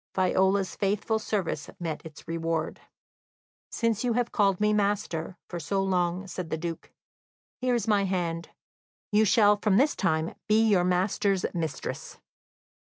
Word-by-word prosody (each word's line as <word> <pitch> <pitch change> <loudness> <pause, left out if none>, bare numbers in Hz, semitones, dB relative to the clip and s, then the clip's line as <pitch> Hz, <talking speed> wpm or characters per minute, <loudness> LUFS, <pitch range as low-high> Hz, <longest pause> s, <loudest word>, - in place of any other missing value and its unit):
Viola's 190 +1 +2
faithful 210 +2 0
service 190 -9 -2
met 165 -3 -4
its 160 -2 -12
reward. 165 -1 -2 0.9
"Since 230 -1 0
you 245 -2 +1
have 240 0 0
called 200 -4 +2
me 210 0 +3
'master' 200 -4 -1
for 175 - -5
so 195 +5 -1
long," 180 0 0
said 180 -3 -6
the 160 - -1
Duke, 165 0 -6 0.7
"here 250 -1 +1
is 230 -3 -1
my 205 -2 +3
hand; 170 -3 -2 0.6
you 215 +1 +4
shall 210 0 +5
from 205 -1 +2
this 285 +5 +3
time 160 -4 0
be 215 0 +4
your 195 -4 +4
master's 190 +1 +1
mistress." 160 -4 -4
190 Hz, 145 wpm, -27 LUFS, 170-210 Hz, 0.9 s, shall